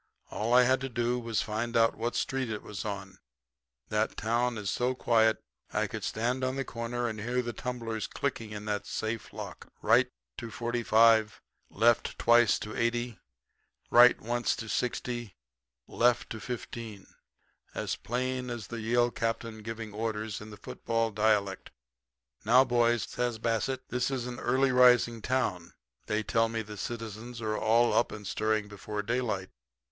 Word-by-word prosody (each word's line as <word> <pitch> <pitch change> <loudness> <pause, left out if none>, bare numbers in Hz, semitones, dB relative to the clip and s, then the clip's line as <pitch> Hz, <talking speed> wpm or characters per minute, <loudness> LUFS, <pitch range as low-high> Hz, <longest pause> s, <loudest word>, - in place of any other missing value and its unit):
All 110 +3 -2
I 125 +1 +7
had 130 +1 +3
to 135 - -3
do 120 0 0
was 115 -2 -3
to - - -4
find 115 +2 -1
out 115 0 +4
what 115 +2 -2
street 135 -2 -1
it 105 -1 -4
was 105 -1 -6
on. 100 -2 -6 0.7
That 105 +1 0
town 120 +2 0
is 100 -2 -2
so 125 +1 0
quiet 110 -3 +3 0.3
that - - -1
I - - +1
could - - -6
stand 125 +4 -1
on 130 0 0
the 135 0 -2
corner 120 +1 -3
and 110 -2 -4
hear 125 +3 0
the 120 0 -4
tumblers 115 -3 -4
clicking 120 -5 -3
in 105 0 -7
that 105 -1 -2
safe 110 0 -3
lock - - -8
"right - - +4 0.3
to 115 - -6
45; 115 -2 +3 0.3
left 115 +3 +2
twice 120 -2 +5
to 105 - -6
80; 120 0 -1 0.7
right 120 +1 +7
once 120 +2 0
to 115 - -6
60; 120 -4 -2 0.5
left 120 0 +2
to 110 - -4
15" 115 -4 -6 0.7
as - - -2
plain 125 +1 -2
as 120 -4 -5
the 115 +4 -6
Yale 120 +2 +2
captain 115 -1 -3
giving 115 -1 -6
orders 110 -1 -3
in 105 - -9
the 105 - -10
football 115 +1 -2
dialect. 105 -2 +1 0.7
Now, 125 +5 +6
boys,' 120 -3 +2
says 120 -2 -2
Bassett, 120 +4 -1
'this 125 +1 0
is 130 -3 -2
an 125 -1 -6
early 130 +2 +2
rising 125 -2 +5
town. 105 -10 -1 0.3
They 110 0 0
tell 115 +1 +2
me 115 -1 -2
the 105 0 -9
citizens 115 +2 -6
are 110 -1 -1
all 115 +3 +3
up - - +2
and 105 -1 -8
stirring 110 +1 0
before 105 +1 -5
daylight. 110 -5 -2
115 Hz, 165 wpm, -30 LUFS, 110-120 Hz, 0.7 s, I